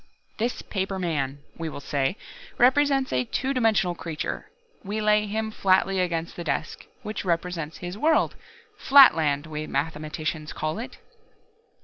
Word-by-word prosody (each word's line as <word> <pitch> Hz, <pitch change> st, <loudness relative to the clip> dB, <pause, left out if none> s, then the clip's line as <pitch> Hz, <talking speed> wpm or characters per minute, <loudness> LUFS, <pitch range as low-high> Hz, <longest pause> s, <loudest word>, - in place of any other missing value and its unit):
"This 235 Hz, +3 st, -1 dB
paper 195 Hz, -1 st, -3 dB
man, 145 Hz, -6 st, -2 dB, 0.2 s
we 165 Hz, -1 st, -3 dB
will 150 Hz, -, -7 dB
say, 140 Hz, +5 st, -1 dB, 0.4 s
represents 270 Hz, +1 st, +3 dB
a 125 Hz, 0 st, +2 dB
two 265 Hz, -, -2 dB
dimensional 220 Hz, -8 st, +2 dB
creature. 165 Hz, -2 st, -5 dB, 0.3 s
We 210 Hz, +2 st, -3 dB
lay 210 Hz, 0 st, +3 dB
him 220 Hz, +1 st, -2 dB
flatly 190 Hz, -1 st, +2 dB
against 170 Hz, -2 st, -1 dB
the 175 Hz, -, -5 dB
desk, -, -, -3 dB, 0.2 s
which 215 Hz, 0 st, -4 dB
represents 170 Hz, -3 st, -2 dB
his 180 Hz, +3 st, -7 dB
world 315 Hz, +4 st, +2 dB, 0.4 s
Flatland, 160 Hz, -, +6 dB
we 155 Hz, -1 st, -5 dB
mathematicians 155 Hz, +1 st, -3 dB
call 155 Hz, +4 st, -3 dB
it. 240 Hz, -, -7 dB
180 Hz, 135 wpm, -25 LUFS, 155-215 Hz, 0.4 s, Flatland